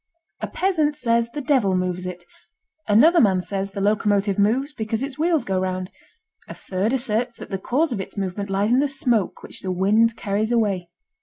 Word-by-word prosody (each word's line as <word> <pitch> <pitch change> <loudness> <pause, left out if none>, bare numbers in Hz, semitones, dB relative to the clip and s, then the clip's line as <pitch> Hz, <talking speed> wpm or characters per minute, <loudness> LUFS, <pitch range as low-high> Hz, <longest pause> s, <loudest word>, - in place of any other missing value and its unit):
A - - -3
peasant 315 -6 0
says 235 -4 +1
the 295 +5 -5
devil 260 -10 +2
moves 180 0 -2
it. 180 -1 -8 0.6
Another 300 +12 +6
man 190 -4 +3
says 195 +1 -3
the 200 - -6
locomotive 205 -1 +1
moves 255 +8 +1
because 220 0 -3
its 275 +1 -6
wheels 325 -1 +1
go 190 -1 0
round. 185 0 -3 0.6
A - - -8
third 195 +4 -2
asserts 240 -2 -1
that - - -10
the 195 - -2
cause 280 - 0
of 210 -5 -2
its 190 - -10
movement 200 +1 -3
lies 200 +3 +1
in 250 - +4
the 290 - +2
smoke 245 -7 0
which - - -8
the 185 - -3
wind 215 +5 +3
carries 210 +3 -1
away. 200 -7 0
215 Hz, 190 wpm, -22 LUFS, 195-255 Hz, 0.6 s, Another